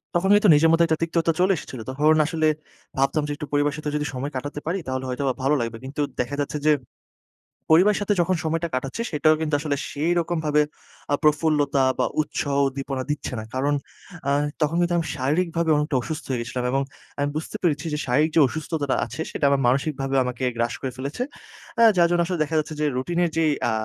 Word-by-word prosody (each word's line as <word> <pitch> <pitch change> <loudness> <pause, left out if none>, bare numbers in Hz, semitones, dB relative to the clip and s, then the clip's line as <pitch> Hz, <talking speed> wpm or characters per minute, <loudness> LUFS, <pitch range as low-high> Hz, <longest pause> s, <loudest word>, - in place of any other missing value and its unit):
তখন 190 +3 +2
কিন্তু 210 -2 +4
নিজের 160 +2 +4
মধ্যে 170 +1 +5
একটা 160 -1 +1
তিক্ততা 165 0 +1
চলে 190 +2 +4
এসেছিল। 130 -4 -8
তখন 150 +4 +3
আসলে 160 -1 +1 0.5
ভাবতাম 135 +3 +2
যে, - - -3
"একটু 150 0 -6
পরিবারের 145 0 +2
সাথে 150 -1 -3
যদি 150 0 -1
সময় 135 +3 -4
কাটাতে 145 +3 -4
পারি, 185 +3 0
তাহলে 130 0 -2
হয়তোবা 130 0 -1
ভালো 140 +3 +3
লাগবে।" 115 -1 -3
কিন্তু 145 +2 -4 0.2
দেখা 135 +4 -1
যাচ্ছে 145 +1 -2
যে, 155 - +7 1.0
পরিবারের 190 +7 +5
সাথে 205 0 +1
যখন 185 +2 +1
সময়টা 165 +1 -1
কাটাচ্ছি, 135 - -3
সেটাও 155 +1 +4
কিন্তু 155 -1 -2
আসলে 145 -1 -1
সেইরকমভাবে 160 -1 +1 0.5
আ - - +6
প্রফুল্লতা 150 -3 +3 0.2
বা - - +3 0.2
উৎসাহ 145 -1 -2
উদ্দীপনা 135 -1 -4
দিচ্ছে 145 -3 -4
না। - - -5
কারণ 140 +3 +1 0.5
অ্যা 140 - +1 0.3
তখন 155 +2 +1
কিন্তু 175 0 +1
আমি 165 - 0
শারীরিকভাবে 165 +4 0
অনেকটা 150 -1 -1
অসুস্থ 160 +3 -5
হয়ে 125 -2 0
গেছিলাম 125 +1 -4
এবং 135 +1 +1 0.4
আমি 145 0 +1
বুঝতে 155 - -5
পেরেছি 150 -2 +1
যে - - 0
শারীরিক 150 +6 +2
যে 160 - +6
অসুস্থতা 155 -1 -2
আছে, 160 - -6
সেটা 145 - -1
আমার 140 -1 +2
মানসিকভাবে 135 +1 0
আমাকে 125 +1 -4
গ্রাস 120 +1 0
করে 130 -2 -3
ফেলেছে। 140 - -3 0.6
আ - - +8
যার 170 -1 +6
জন্য 175 0 +3
আসলে 180 -2 -3
দেখা 160 +1 -4
যাচ্ছে 155 +1 -4
যে, - - +2
রুটিনের 175 +5 0
যে 165 - +3 0.3
আ - - +1
150 Hz, 200 wpm, -24 LUFS, 135-165 Hz, 1.0 s, আ